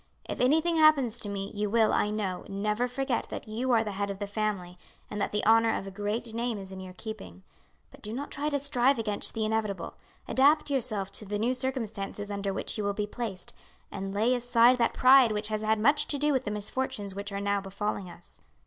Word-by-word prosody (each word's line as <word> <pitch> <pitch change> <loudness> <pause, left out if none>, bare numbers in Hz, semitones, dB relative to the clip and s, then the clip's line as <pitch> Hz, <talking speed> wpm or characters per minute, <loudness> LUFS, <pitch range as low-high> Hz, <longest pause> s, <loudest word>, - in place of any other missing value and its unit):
If - - -5
anything 320 +6 +3
happens 280 -7 +4
to 205 - -4
me, 195 -1 -4
you 210 0 -1
will, 225 0 +3
I 210 - +2
know, 205 -4 -2
never 210 +4 0
forget 255 0 -2
that - - -6
you 230 +4 -2
are 230 -2 +4
the 210 - -4
head 200 +1 -2
of 200 - -4
the 205 - -3
family, 200 -4 -3 0.3
and 210 - -3
that - - -1
the 210 - -1
honour 225 0 +5
of - - -6
a 195 - -7
great 215 +4 -3
name 235 -1 -2
is 195 -1 -8
in 190 - -7
your 185 -1 -9
keeping; 185 - -8 0.5
but - - -16
do 210 - -6
not 270 +5 -5
try 295 +2 -1
to 285 - +1
strive 275 -1 +2
against 210 -3 -2
the 220 -1 0
inevitable. 215 -2 -2 0.3
Adapt 290 +3 +3
yourself 215 -8 -1
to 210 - -4
the 205 +1 -2
new 235 +4 +1
circumstances 225 -6 -3
under 200 -1 -2
which 195 - -3
you - - -1
will 200 0 0
be 210 - -1
placed, 210 -4 -6 0.4
and 195 -1 -4
lay 220 +5 +2
aside 245 0 +4
that 235 - +2
pride 255 -2 +7
which 210 0 -2
has 215 0 -2
had 220 0 +2
much 285 +7 +3
to 290 - +1
do 295 +1 +2
with 260 - 0
the - - -1
misfortunes 210 0 -3
which 200 +1 -5
are 200 - -3
now 200 0 0
befalling 200 -1 -4
us. 175 0 -14
215 Hz, 230 wpm, -28 LUFS, 200-245 Hz, 0.5 s, pride